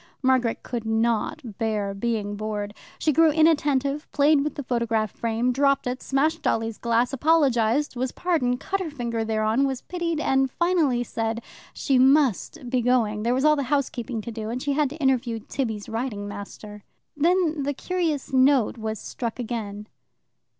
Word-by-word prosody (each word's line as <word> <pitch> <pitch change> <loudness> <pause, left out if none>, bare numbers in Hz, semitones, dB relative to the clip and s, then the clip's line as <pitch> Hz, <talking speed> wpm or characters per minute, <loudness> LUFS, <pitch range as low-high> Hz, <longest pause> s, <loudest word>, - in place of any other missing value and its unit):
Margaret 255 -3 +2
could 240 -3 -4
not 225 +2 -1
bear 210 -3 -1
being 205 -1 -2
bored. 210 -1 -4 0.2
She 305 - +1
grew 325 +2 +5
inattentive, 290 -2 +2
played 290 0 +4
with 300 - -3
the 285 - -5
photograph 230 -4 0
frame, 235 +2 -1
dropped 275 +1 +2
it, 250 +1 -3
smashed 310 +4 0
Dolly's 225 -4 -1
glass, 235 +2 +1
apologized, 275 -3 +2
was 250 +1 -2
pardoned, 280 -9 0
cut 390 +6 -2
her 365 -4 -3
finger 235 -5 -3
thereon, 220 +4 +1
was 265 -2 -4
pitied, 335 -3 -2
and 270 -3 +2
finally 315 -6 +1
said 225 0 -3 0.3
she 265 -2 +1
must 270 - +3
be 250 0 +1
going 230 -4 +1
there 235 +3 +1
was 265 +3 +1
all 305 0 +6
the 285 - -1
housekeeping 250 -5 -1
to 235 - -7
do, 220 -1 -5
and 250 +2 -4
she 285 - 0
had 295 -1 +1
to 300 - -9
interview 260 -5 +1
Tibby's 220 -2 -4
riding 225 -3 -3
master. 205 +1 -9 0.3
Then 330 0 +2
the 285 +1 -1
curious 325 -5 -2
note 260 -3 +3
was 220 0 -3
struck 230 +2 -5
again. 215 -4 -5
250 Hz, 165 wpm, -25 LUFS, 225-285 Hz, 0.3 s, all